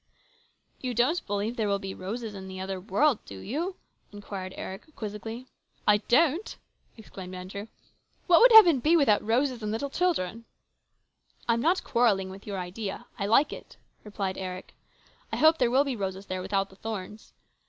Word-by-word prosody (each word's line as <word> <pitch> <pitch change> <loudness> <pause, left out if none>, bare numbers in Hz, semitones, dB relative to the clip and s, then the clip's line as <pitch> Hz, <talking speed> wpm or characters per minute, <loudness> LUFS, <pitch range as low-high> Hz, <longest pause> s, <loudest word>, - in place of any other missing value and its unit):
" - - -38
You 250 -2 -3
don't 260 +10 +2
believe 205 +3 -2
there 220 -2 0
will 200 0 +1
be 195 -1 -6
roses 215 +4 -5
in 190 -1 -8
the 190 0 -7
other 190 0 -4
world, 210 +8 +1
do 100 - -10
you? 320 - -3 0.2
" - - -42
inquired 200 -2 -7
Eric 190 +8 -7
quizzically. 220 +3 -6 0.2
" - - -37
I 210 -1 +6
don't? 300 - +2 0.2
" - - -38
exclaimed 190 -4 -9
Andrew. 195 +3 -7 0.3
" - - -41
What 345 -2 +6
would - - +8
heaven 355 - +9
be 320 +7 +4
without 235 -10 +4
roses 245 +2 +1
and 210 -1 -3
little 270 +6 -3
children? 230 - -1 0.3
" - - -50
" - - -32
I'm 230 0 +2
not 345 +7 +2
quarrelling 200 -6 +2
with 195 +2 -12
your 200 -2 -3
idea. 190 +3 -5
I 200 - -1
like 270 +7 +4
it," - - -11 0.3
replied 200 -3 -4
Eric. 185 0 -6 0.3
" - - -32
I - - -2
hope 320 +1 +5
there 245 - +3
will 265 +3 +4
be 275 -3 -3
roses 195 -2 -4
there 185 -1 -4
without 195 +1 -1
the 190 - -17
thorns. 210 -1 -7
210 Hz, 195 wpm, -28 LUFS, 195-255 Hz, 0.3 s, heaven